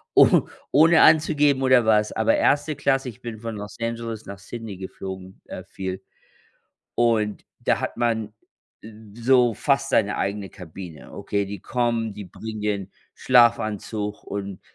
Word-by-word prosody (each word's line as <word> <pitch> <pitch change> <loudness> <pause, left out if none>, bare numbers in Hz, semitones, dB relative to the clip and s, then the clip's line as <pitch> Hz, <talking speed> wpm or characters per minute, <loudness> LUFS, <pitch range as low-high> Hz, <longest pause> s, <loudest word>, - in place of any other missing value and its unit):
oh - - +6 0.2
ohne 160 +4 +6
anzugeben 150 -3 +4
oder 130 -3 +4
was, 105 -1 +3
aber 290 - +2
1. 150 - +2
Klasse 135 -2 0
ich 110 - -13
bin 115 -2 -7
von 115 -1 -5
Los 105 0 -8
Angeles 115 -1 -4
nach 100 0 -9
Sydney 110 0 -8
geflogen, 95 0 -8
äh, - - -7
viel 95 0 -6 0.9
und 110 -3 +1 0.2
da - - +1
hat - - -4
man 110 -3 -1 0.9
so 125 -2 +4
fast 135 +2 +1
seine 105 -2 +2
eigene 100 0 -3
Kabine. 85 -3 -11
Okay, 100 -1 -2
die 100 -1 -7
kommen, 115 -2 -1
die 105 0 -8
bringen 110 +4 -8
dir 105 0 0
'n 95 -2 -9 0.2
Schlafanzug 110 -4 +2
und 100 -2 -6
110 Hz, 145 wpm, -23 LUFS, 100-120 Hz, 0.9 s, oh